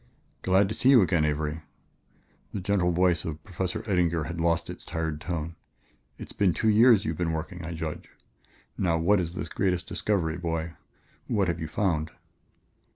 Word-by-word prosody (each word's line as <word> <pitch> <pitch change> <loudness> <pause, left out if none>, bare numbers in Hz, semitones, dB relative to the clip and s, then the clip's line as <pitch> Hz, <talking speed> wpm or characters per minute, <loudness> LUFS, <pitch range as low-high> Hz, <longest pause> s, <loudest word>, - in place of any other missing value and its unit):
"Glad 95 +1 +3
to - - -2
see 130 - +2
you 125 -6 +8
again, 85 -4 +2
Avery." 75 +1 -2 0.9
The - - -1
gentle 95 -1 +1
voice 90 -1 +2
of 75 -1 -6
Professor 90 0 -3
Eddinger 85 -5 +1
had 85 0 -4
lost 85 0 +1
its - - -8
tired 80 -2 -3
tone. 85 -1 -3 0.6
"It's - - -9
been 95 -4 +2
two 110 - +2
years 110 -1 +6
you've - - -3
been 85 -2 0
working, 85 +2 -5
I 85 +1 -5
judge. 80 +2 -5 0.7
Now 85 -3 +2
what 95 +5 +3
is 85 -1 -3
this 85 - -4
great 90 0 -1
discovery, 90 -5 -1
boy? 80 -1 -3 0.5
What 100 -4 +1
have 85 -1 -2
you 80 - -4
found?" 80 -3 0
85 Hz, 170 wpm, -27 LUFS, 80-95 Hz, 0.9 s, you